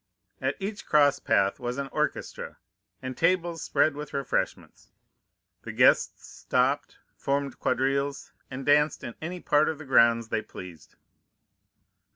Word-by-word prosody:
At - - 0
each 205 +1 -5
cross 145 -2 +4
path 100 0 +1
was 125 +1 -4
an 140 0 -3
orchestra, - - -3 0.5
and 130 0 -5
tables 170 0 +1
spread 155 - +2
with 145 -1 -7
refreshments; 140 -2 -3 0.7
the - - -7
guests - - +3
stopped, - - -1 0.2
formed 140 -1 -2
quadrilles, 135 +2 -1 0.2
and 135 0 -6
danced 150 +1 +3
in 120 - -6
any 175 +3 -5
part 150 0 +3
of 160 - -3
the 155 - -10
grounds 115 -3 +4
they 110 - 0
pleased. 90 -6 -12
140 Hz, 135 wpm, -27 LUFS, 125-155 Hz, 0.7 s, cross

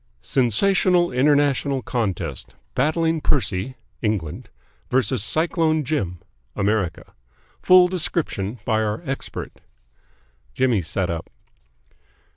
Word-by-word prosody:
SENSATIONAL 175 - +2
INTERNATIONAL 140 0 +2
CONTEST 95 - -3 0.2
BATTLING 160 +3 +1
PERCY 110 -3 0 0.3
(England) 105 -9 -2 0.4
v 130 +1 +3
CYCLONE 155 - +1
JIM 125 - -2 0.4
(America) 100 -4 -1 0.5
FULL 185 0 +7
DESCRIPTION 155 - -2
BY 110 -2 +1
OUR 105 +7 -2
EXPERT 135 -1 -6 0.9
Jimmy 125 -6 +2
sat 90 +1 -2
up. 85 -1 -5
130 Hz, 85 wpm, -22 LUFS, 100-155 Hz, 0.9 s, FULL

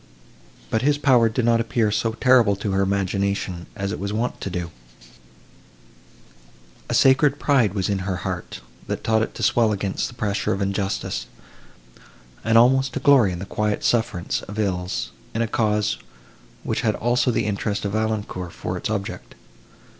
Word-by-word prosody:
But 110 - +1
his 145 +2 +2
power 125 -6 +4
did 115 +2 -1
not 115 -1 +3
appear 115 -2 0
so 115 +2 0
terrible 120 -4 +4
to 100 +1 -3
her 95 0 +1
imagination, 100 -2 -1
as 100 0 -3
it - - -4
was 100 +1 -3
wont 115 +4 -2
to - - -3
do: 90 -2 -4 2.2
a - - 0
sacred 135 +2 +4
pride 125 -10 +2
was 95 -2 0
in 100 -1 0
her 95 0 -2
heart, - - -5 0.3
that - - -4
taught 110 0 +2
it - - -3
to - - -5
swell 115 -2 +3
against 100 -2 -2
the 120 - -11
pressure 105 -3 -1
of 95 - -3
injustice, 100 - -2 1.2
and 115 0 +3
almost 130 +3 +4
to - - -2
glory 130 -7 +5
in 90 - -4
the 95 - -6
quiet 105 +1 -1
sufferance 105 -6 0
of 105 +2 -8
ills, 90 -3 -2 0.2
in 115 - +1
a - - -1
cause, 105 -1 0 0.6
which - - -1
had 110 -2 +1
also 120 +1 +1
the 115 -2 0
interest 105 0 -2
of 100 - -1
Valancourt 105 -5 -2
for - - -4
its - - -4
object. 100 -3 -4
105 Hz, 170 wpm, -23 LUFS, 100-115 Hz, 2.2 s, glory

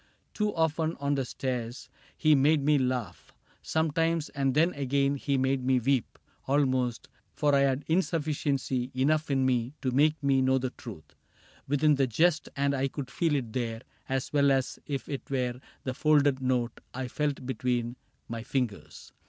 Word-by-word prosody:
Too 210 -1 0
often 160 0 0
on 140 0 0
the 135 -2 0
stairs. 125 -1 -4 0.3
He 155 -1 +4
made 145 +1 +4
me 150 -1 +4
laugh 125 -8 -3 0.3
Sometimes, 160 0 0
and 135 -2 -1
then 165 +4 +3
again 140 0 +1
he 140 0 -1
made 130 0 +1
me 130 0 +3
weep 130 -1 0 0.3
Almost; 130 -3 +1 0.3
for 145 -1 +2
I 140 - +5
had 140 0 +1
insufficiency 145 -7 0
Enough 150 +4 +1
in 135 -1 +2
me 125 0 0
to 130 - +1
make 150 +3 +2
me 135 -1 +3
know 130 0 +3
the 130 -1 -2
truth 80 - -11 0.5
Within 145 +2 +3
the 135 -2 +2
jest, 160 +6 +2
and 140 0 +1
I 135 0 0
could 135 -1 -6
feel 165 0 +1
it 120 -6 -3
there 115 -3 -2 0.3
As 135 +2 -2
well 140 -1 +4
as 135 -1 0
if 140 -2 -3
it 140 - -6
were 125 -2 -1 0.2
the 130 - -2
folded 145 -1 +3
note 125 -2 0 0.2
I 130 0 -3
felt 145 0 -2
between 125 -1 -1 0.3
my 115 -1 -5
fingers. 120 -4 -4
135 Hz, 170 wpm, -28 LUFS, 125-145 Hz, 0.5 s, I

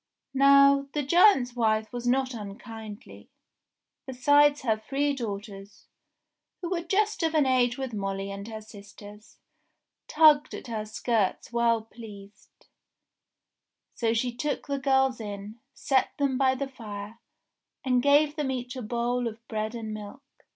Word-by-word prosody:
Now, 275 0 +5
the 295 - -1
giant's 280 - +4
wife 220 -1 0
was 245 0 -4
not 260 +1 +1
unkindly; 215 0 -10 0.8
besides 290 +3 +3
her 225 -4 +2
three 275 +6 -1
daughters, 205 -4 -7 0.7
who 355 -1 -5
were 350 -2 0
just 405 +5 0
of 325 -1 0
an 300 -3 +4
age 250 -2 +2
with 265 -3 -5
Molly 195 -1 -3
and 200 +1 -7
her 220 -1 -7
sisters, 210 0 -14 0.7
tugged 305 -1 +4
at - - -9
her 220 -3 -4
skirts 215 0 -1
well 235 -1 +2
pleased; 210 -3 -14 1.3
so 230 -2 0
she 235 +2 -1
took 285 +4 -3
the 280 -1 -2
girls 265 -1 +2
in, 205 +1 -7 0.2
set 265 -2 0
them 280 -2 0
by 260 0 +2
the 275 +1 -3
fire, 215 -4 -9 0.7
and 250 -1 +2
gave 290 +2 +4
them 295 -3 -1
each 250 0 -4
a 255 - -5
bowl 240 +2 -1
of 230 +1 -9
bread 215 +1 -3
and 220 -2 -5
milk. 215 +6 -9
245 Hz, 145 wpm, -27 LUFS, 215-275 Hz, 1.3 s, Now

